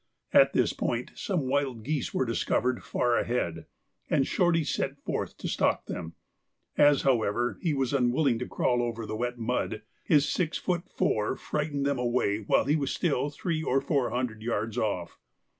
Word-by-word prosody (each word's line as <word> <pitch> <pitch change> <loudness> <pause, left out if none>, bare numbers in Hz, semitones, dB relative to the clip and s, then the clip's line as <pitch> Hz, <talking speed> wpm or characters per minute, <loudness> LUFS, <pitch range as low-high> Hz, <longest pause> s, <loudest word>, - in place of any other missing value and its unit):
At - - +6
this - - +2
point - - -2
some 175 -10 -2
wild 130 -4 0
geese 145 +1 -2
were 130 - 0
discovered 120 +1 0
far 120 -1 +1
ahead, 85 -9 -2 0.4
and 140 -3 +3
Shorty 175 -1 +2
set 145 - -2
forth - - -3
to - - -5
stalk - - +1
them; 85 -2 -6 0.6
as, 145 -1 +5
however, 120 -2 +1
he 165 -5 0
was 135 -1 0
unwilling 125 -1 +2
to 125 - -4
crawl 120 -1 +1
over 115 -1 -3
the 110 - -4
wet 120 +2 -2
mud, 115 -2 -2 0.2
his 150 -2 +4
six 165 -3 0
foot 180 -1 -2
four 105 +4 0
frightened 145 -1 -2
them 140 -2 0
away 120 -4 +1
while 105 - +2
he 145 +3 +2
was 140 -3 -1
still 145 -4 0
three 155 +2 -2
or 135 -3 +2
four 135 -4 0
hundred 120 -3 -3
yards 115 -1 -2
off. 95 -7 -2
125 Hz, 175 wpm, -28 LUFS, 115-145 Hz, 0.6 s, At